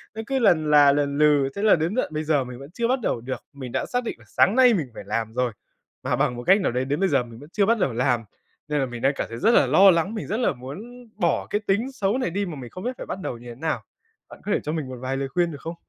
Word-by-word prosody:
nó 220 - -4
cứ 270 -1 0
lần 155 -9 +3
là 145 -1 +7
lần 140 -1 0
lừ, 145 -3 +4
thế 200 - -3
là 215 - +6
đến 170 +6 -1
tận 255 - -1
bây 155 +1 -2
giờ 150 -3 +1
mình 125 0 -9
vẫn 140 +4 -11
chưa 235 +4 -1
bắt 260 +1 +1
đầu 115 - -1
được. 130 +2 -5
Mình 130 -3 -8
đã - - -1
xác 245 0 -2
định - - -4
là - - -18
sáng 205 - +3
nay 255 -2 +6
mình 160 -9 -1
phải - - -8
làm 110 +2 -3
rồi, 125 -1 0 0.5
mà - - 0
bằng 125 - 0
một 120 - -6
cách 195 +2 +6
nào 185 - 0
đấy 125 +2 -1
đến 145 +5 -1
bây 195 -1 +2
giờ 125 - +2
mình 115 -1 -12
vẫn 145 +4 -13
chưa 200 -2 +3
bắt 230 0 +2
đầu 130 - +1
làm, 120 -1 +1 0.4
nên 150 -1 0
là 135 - +1
mình 120 -2 -7
đang 135 +2 +3
cảm - - -3
thấy 115 - -6
rất 225 - +4
là 135 - +5
lo 190 +8 +7
lắng, 170 +4 0
mình 215 - -5
rất 215 - -1
là 250 - +2
muốn 220 - -10
bỏ 175 -5 0
cái 210 - -1
tính 220 +7 +1
xấu 215 -2 0
này 255 - -1
đi 200 +3 -2
mà 170 - -6
mình 125 -4 -8
không 185 +7 -9
biết 250 +1 -3
phải - - -7
bắt 190 - -5
đầu 120 - -4
như 120 - -13
thế 120 - -8
nào, 155 +4 -2 0.5
bạn - - -13
có 210 - -2
thể - - +2
cho 150 - -3
mình 155 -5 -3
một 130 - -7
vài 135 +1 -2
lời 135 - -2
khuyên, 175 0 0
được 145 - -9
không? 165 +1 -6
155 Hz, 320 wpm, -24 LUFS, 130-205 Hz, 0.5 s, là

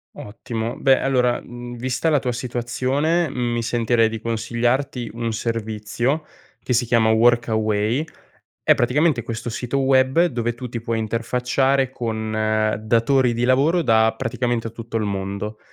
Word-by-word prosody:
Ottimo, 115 +2 -5
beh 135 -1 +4
allora, 125 -2 +1
mhmm, 120 0 -9
vista 125 +5 -2
la 150 - +4
tua 125 -1 -2
situazione 130 +7 -1
mi 120 -1 -1
sentirei 115 -1 +2
di 110 0 -5
consigliarti 120 +2 -1
un 115 -1 -3
servizio 115 +6 -2 0.4
che 125 - -1
si 120 +1 +2
chiama 115 -1 +3
Workaway, 110 +2 +2 0.6
è - - +5
praticamente 130 +1 +2
questo 115 +1 -5
sito 125 +4 -2
web 135 +4 +3
dove 120 -6 -1
tu 125 +2 -7
ti 115 -1 -5
puoi 115 -1 -2
interfacciare 125 +4 0
con 110 -3 -4 0.5
datori 120 +3 +2
di 120 +1 0
lavoro 145 +7 +3
da 110 -4 +3
praticamente 120 -2 -2
a - - -7
tutto 115 0 -5
il 110 - -1
mondo, 100 +2 -4
120 Hz, 145 wpm, -22 LUFS, 115-130 Hz, 0.6 s, è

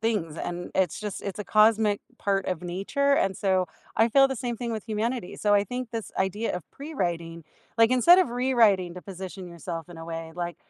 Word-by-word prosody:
things, 205 -9 -1
and 175 +1 -5
it's 185 -4 +1
just 210 -2 -5
it's 200 0 -5
a 210 - -4
cosmic 215 -1 +4 0.2
part 195 -1 0
of 180 -3 -2
nature, 200 +11 0
and 195 -6 +1
so, 185 -2 +1 0.3
I 225 +1 +4
feel 270 +3 +6
the 265 - -3
same 240 0 -3
thing 235 -1 -3
with 220 +1 -6
humanity. 220 0 -2
So, 205 -1 +2
I 200 - +4
think 250 +2 -5
this 225 -2 -5
idea 190 +1 -1
of 180 - -10
prewriting, 170 - -4 0.3
like, 230 +1 +6
instead 340 +9 +7
of 365 -10 +2
rewriting 225 -8 +3
to 180 - -9
position 190 -1 -8
yourself 170 -1 -6
in 170 -2 -11
a 165 - -7
way 165 -1 -6
like 175 -1 -4
200 Hz, 210 wpm, -26 LUFS, 175-230 Hz, 0.3 s, instead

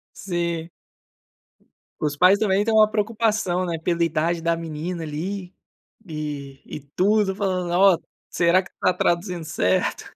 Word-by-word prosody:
Sim. 170 -3 -3 1.3
Os 145 -1 -2
pais 185 +4 +6
também 205 -1 +2
têm 225 - +1
uma 215 -1 +6
preocupação, 215 -4 0
né, 170 -2 -2
pela 170 0 0
idade 165 +1 0
da 170 0 +1
menina, 165 +1 -5
ali, 180 +5 -5 0.5
e 145 -4 -6
e - - -7 0.2
tudo 205 +1 +2
falando: 185 -3 -1
"Ó, 190 0 +5 0.3
será 170 +2 +3
que 180 - -15
está 185 - 0
traduzindo 175 -1 -1
certo?". 95 - 0
175 Hz, 135 wpm, -23 LUFS, 165-195 Hz, 1.3 s, pais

